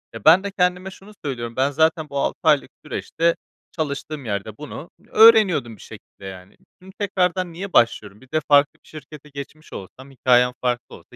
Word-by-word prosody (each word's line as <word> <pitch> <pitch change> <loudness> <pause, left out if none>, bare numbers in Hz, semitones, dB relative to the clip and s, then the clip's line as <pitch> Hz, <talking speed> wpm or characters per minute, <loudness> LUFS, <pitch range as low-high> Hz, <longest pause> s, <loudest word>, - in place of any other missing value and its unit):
E, 115 - -10
ben 175 +5 +7
de 200 - -4
kendime 180 0 -1
şunu 195 +2 -15
söylüyorum. 120 -4 -5
Ben 135 +2 +1
zaten 160 +1 +1
bu 140 - -3
6 - - -2
aylık 150 -3 +3 0.2
süreçte 165 +2 -1 0.4
çalıştığım 150 -2 -5
yerde 105 0 -4
bunu 150 +3 -9 0.2
öğreniyordum 210 - +5
bir - - -17
şekilde 100 - -14
yani. 95 0 -11 0.3
Şimdi 190 +1 -15
tekrardan 185 -3 -1
niye 190 +3 -7
başlıyorum? 105 -3 +1
Bir 130 - -20
de 155 - +1
farklı 145 0 +4
bir - - -24
şirkete 150 -1 -12
geçmiş 140 +3 -10
olsam 130 +8 -11
hikâyem 125 -1 +3
farklı 125 -1 -3
olsa - - -18
150 Hz, 180 wpm, -21 LUFS, 125-180 Hz, 0.4 s, ben